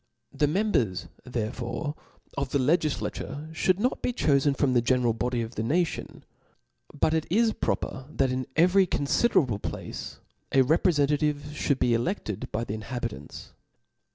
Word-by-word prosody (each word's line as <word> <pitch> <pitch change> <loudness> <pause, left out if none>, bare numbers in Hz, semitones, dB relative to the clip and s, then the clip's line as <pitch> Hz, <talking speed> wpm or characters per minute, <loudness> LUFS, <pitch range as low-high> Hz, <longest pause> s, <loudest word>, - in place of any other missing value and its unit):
The 150 - +2
members 150 - 0 0.2
therefore 125 +4 -3 0.4
of 140 -1 -2
the 140 - +1
Jegiffaturc 155 +1 -1
(hould 185 +3 +2
not 250 +4 0
be - - 0
chofen 140 - +2
from 135 -3 +2
the 120 - +4
general 125 -1 +2
body 120 +1 -1
of 115 +2 -7
the 110 - -3
nation; 160 +9 -1 0.7
but 155 - +1
it 160 -1 0
Js 220 +4 +2
proper 130 -1 -2
that 135 -3 +1
in 130 0 -2
every 185 +3 +5
confiderable 140 - +2
place, - - -6 0.3
a 135 - +5
reprc 155 +1 +3
fentativc 150 0 -1
(hould 140 - +3
be 125 - +2
elefted 115 - -2
by 115 - -1
the 105 - -4
inhabitants. 110 - -6
140 Hz, 150 wpm, -27 LUFS, 120-160 Hz, 0.7 s, every